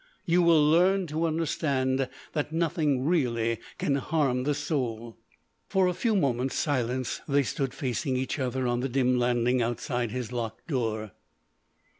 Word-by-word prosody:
You 175 -1 +3
will 165 -3 +5
learn 185 +4 +4
to 160 +2 -1
understand 135 -5 0 0.2
that 150 -1 -2
nothing 155 -5 0
really 115 -8 +1 0.2
can 140 - +1
harm 135 -4 0
the 145 0 +1
soul." 120 -6 -3 0.5
For 190 -1 +3
a 180 - +1
few 225 +4 0
moments' 135 -7 0
silence 130 -4 -1
they 140 -1 +3
stood 135 +2 -2
facing 130 0 -2
each 130 +3 -2
other 130 0 -1
on 120 0 +1
the 135 +2 -2
dim 125 -1 +2
landing 120 +1 +2
outside 120 +1 -1
his 125 +1 -4
locked 115 -3 -4
door. 110 - -2
130 Hz, 150 wpm, -28 LUFS, 125-155 Hz, 0.5 s, will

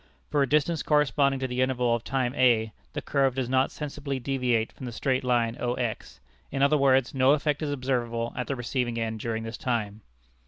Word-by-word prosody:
For 145 -1 +2
a 135 - +1
distance 150 +2 +2
corresponding 140 -2 +2
to 130 - 0
the 125 0 -2
interval 125 -2 +1
of 120 -1 -1
time 130 -2 -1
a, 115 -5 +3 0.2
the - - -4
curve 135 -3 +1
does 130 -2 -1
not 130 +1 +2
sensibly 145 -2 -5
deviate 125 -4 0
from 130 - -9
the - - -5
straight 130 +2 -1
line 120 -2 +1
O 120 0 -1
X; 120 -4 -4 0.3
in 135 0 0
other 140 +2 +4
words, 135 -3 +3
no 135 +1 +4
effect 150 0 0
is 155 - -1
observable 120 -4 -2
at 125 - -3
the 140 - -1
receiving 120 -1 -2
end 110 -1 -3
during 115 0 -3
this 115 +1 -6
time. 110 -6 -2
130 Hz, 205 wpm, -27 LUFS, 120-140 Hz, 0.3 s, other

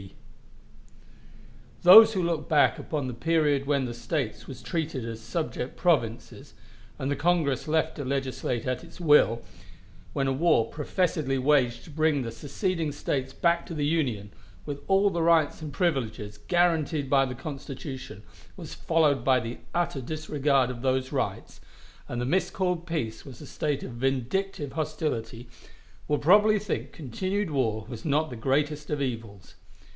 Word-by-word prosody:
Those 220 +5 +10
who 185 -3 0
look 165 -3 -2
back 150 -2 +4
upon 145 -4 -3
the 125 - -4
period 145 +1 +1
when 140 -2 +1
the 120 - -4
States 120 -3 -3
were - - -6
treated 150 0 -3
as 115 -1 -6
subject 155 -2 -4
provinces, 120 -10 -1 0.4
and 135 - -3
the 145 - 0
Congress 160 -6 +1
left 160 +1 +1
to 145 - -5
legislate 130 -3 -2
at 130 +5 -2
its 170 +1 -14
will 145 - +4 0.7
when 135 -2 0
a 135 - +1
war 130 -6 +2
professedly 155 -3 -1
waged 130 -4 +2
to - - -13
bring 155 -1 +1
the 115 -2 -4
seceding 160 - -2
States 135 -2 -3
back 170 +2 +1
to - - -6
the 145 -1 -1
Union, 125 -10 -1 0.3
with 145 -1 -5
all 195 +1 +4
the 170 -2 -1
rights 165 -2 +3
and 155 -2 -6
privileges 110 - -1
guaranteed 160 - +1
by 135 -1 +4
the 125 -1 -5
Constitution, 135 -5 -7 0.3
was - - -8
followed 150 -6 +2
by 130 0 +4
the 120 0 -6
utter 170 -5 -1
disregard 145 -2 0
of 120 -2 -8
those 130 0 0
rights, - - -3 0.5
and 120 - -4
the - - -1
miscalled 180 +2 0
peace 115 -10 -3
was 130 -5 -11
a - - -9
state 145 -2 -2
of - - -7
vindictive 135 +6 -2
hostility 120 -7 -3 0.6
will 150 - +1
probably 210 +6 +5
think 205 -2 -4
continued 185 - -3
war 110 -6 0
was 115 -3 -8
not 155 +1 +1
the - - -5
greatest 145 +5 -1
of 150 - -1
evils. 115 -7 -5
145 Hz, 155 wpm, -27 LUFS, 125-165 Hz, 0.7 s, Those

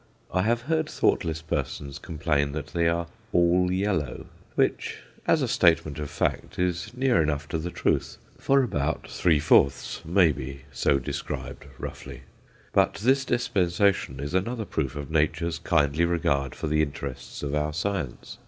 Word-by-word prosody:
I 95 - +3
have 115 +4 +1
heard 160 +4 0
thoughtless 80 0 0
persons 70 -2 -3
complain 75 -4 -1
that 75 0 -6
they 85 -1 +2
are 85 +1 +1 0.3
"all 90 +1 +3
yellow;" 95 -4 -1 0.3
which, - - 0 0.3
as 155 - +4
a - - +1
statement 85 - +3
of 75 -1 -4
fact, - - -2
is 90 +3 -1
near 125 -8 +3
enough 75 -1 -1
to 80 - -1
the 85 +3 -3
truth, - - 0 0.2
for 135 0 +3
about 80 - -1
three 80 -4 +2
fourths 75 0 +3
may 85 0 +4
be 70 -1 -6
so 70 +1 +2
described 70 +2 -5
roughly. - - -7 0.5
But - - +3
this 135 +5 +2
dispensation 100 - +1
is 70 +4 -4
another 110 +5 -1
proof 70 -8 -2
of 75 +1 -6
Nature's 80 +1 +1
kindly 80 -2 +2
regard 70 -6 0
for - - -4
the 75 0 +2
interests 70 -3 -5
of 70 0 -2
our 75 0 0
science. 85 -4 -3
85 Hz, 155 wpm, -26 LUFS, 75-95 Hz, 0.5 s, as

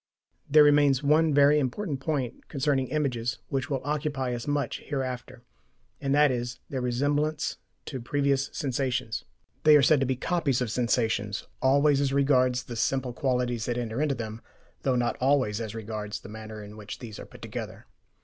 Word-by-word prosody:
There 150 +1 +8
remains 145 -2 +4
one 155 +2 +4
very 145 +1 +5
important 145 +3 -2
point 135 -4 -3
concerning 140 -2 0
images, 125 -5 -1
which 135 +2 -2
will 135 -3 -1
occupy 145 -3 -1
us 120 +2 -5
much 145 -4 -1
hereafter, 130 -3 -5 0.6
and 140 0 +1
that 150 -1 +5
is, 120 0 -3
their 130 -2 -2
resemblance 145 +5 0 0.3
to 130 -4 -5
previous 140 +2 +1
sensations. 130 -4 -2 0.4
They 155 -1 +8
are 140 - +4
said 150 +1 +5
to 135 - +1
be 130 - +1
"copies" 140 -1 0
of 125 -4 -1
sensations, 115 -4 0 0.2
always 140 +1 +4
as 135 -1 0
regards 130 -3 +3
the 120 - -7
simple 125 +2 0
qualities 125 -4 0
that 120 -1 -1
enter 120 +2 -2
into 150 -3 +1
them, 110 -1 -6 0.4
though 130 -2 +1
not 120 -1 0
always 130 -5 +2
as 110 -1 -5
regards 105 -1 -5
the - - -11
manner 110 0 -8
in 105 +1 -11
which 105 -1 -7
these 115 -4 -9
are - - -9
put - - -14
together. - - -6
130 Hz, 175 wpm, -27 LUFS, 120-145 Hz, 0.6 s, There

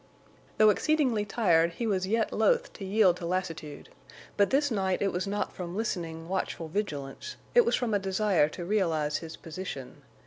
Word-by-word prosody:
Though 215 0 +7
exceedingly 260 -5 +1
tired, 170 -6 +2
he 235 - -3
was 190 -4 0
yet 225 +2 0
loath - - +2
to - - -9
yield 190 -2 +3
to 170 - -5
lassitude, 165 -5 -4 0.5
but 200 -1 +3
this 285 +1 +2
night 190 -3 0
it 200 -1 +1
was 180 +3 -2
not 205 +1 -2
from 180 +1 -6
listening, 165 -7 -3
watchful 175 -3 -3
vigilance; 155 - -4 0.2
it 485 -2 +6
was 475 - +2
from 240 -3 -1
a 205 - +3
desire 195 -4 +2
to 175 +2 -7
realize 165 -7 +1
his 165 -1 -8
position. 160 -6 -7
190 Hz, 175 wpm, -29 LUFS, 170-215 Hz, 0.5 s, Though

